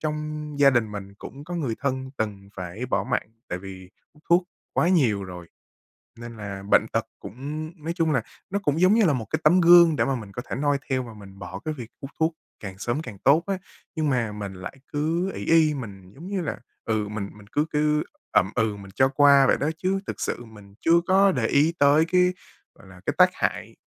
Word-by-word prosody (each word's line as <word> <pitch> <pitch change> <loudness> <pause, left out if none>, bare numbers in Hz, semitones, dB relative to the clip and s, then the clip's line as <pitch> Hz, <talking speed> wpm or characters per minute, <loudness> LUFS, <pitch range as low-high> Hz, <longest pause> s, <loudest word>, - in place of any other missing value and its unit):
trong 150 -1 -4
gia 140 -1 +7
đình 115 -5 +1
mình 100 -1 -7
cũng 135 +7 -10
có 175 +3 -6
người 135 -10 -1
thân 130 -1 -2
từng 100 -3 -4
phải 95 +7 -5
bỏ - - 0
mạng 125 -4 -1 0.2
tại 90 - -3
vì 95 -1 -10 0.2
hút 150 - -23
thuốc 175 +1 +4 0.3
quá 170 - +2
nhiều 120 - +2
rồi, 90 -2 -9 0.7
nên 120 -1 -9
là 100 -2 -6
bệnh - - +5
tật - - +1
cũng 150 - -6
nói 165 +2 -2
chung 165 -3 +1
là 140 - +2 0.3
nó 200 +1 -1
cũng 150 -1 +1
giống 185 +3 +5
như 220 -3 +4
là 155 - +3
một 120 -4 -3
cái - - 0
tấm 175 +4 +5
gương 170 -2 +7
để - - +1
mà 135 - 0
mình 105 -5 -8
có 120 - -5
thể - - -4
noi 145 +1 +1
theo 130 -1 0
và 115 - -10
mình 100 -2 -13
bỏ 90 - -7
cái 155 - -1
việc 120 -6 -8
hút 135 0 -7
thuốc 160 +1 +2 0.3
càng 95 -2 -8
sớm 120 +8 -2
càng 115 -10 -9
tốt 150 - +4
á. 195 - -1 0.4
Nhưng 155 -2 0
mà 115 -5 0
mình 100 -2 -6
lại 95 +8 -8
cứ 165 +6 0
ỷ - - -6
y, 160 -2 +4
mình 100 -8 -8
giống 170 +6 -10
như 195 -2 -2
là, 160 - -4 0.3
ừ, 110 -2 0
mình 105 -1 -4
mình 105 -1 -16
cứ 150 +7 0
cứ 150 0 +1 0.3
ậm 95 - +3
ừ 110 -3 +1
mình 100 -1 -11
cho 130 - +4
qua 140 -1 +5
vậy - - +3
đó 145 - 0
chứ 190 +2 0
thực - - -5
sự 120 - -3
mình 105 -3 -15
chưa 170 +1 +4
có 195 +1 +5
để 125 -7 0
ý 150 +4 +3
tới 145 +3 +5
cái, 180 +1 +3 0.5
gọi 95 - -16
là, 90 -1 -15
cái - - 0
tác - - +7
hại, - - -2
135 Hz, 235 wpm, -25 LUFS, 105-155 Hz, 0.7 s, gia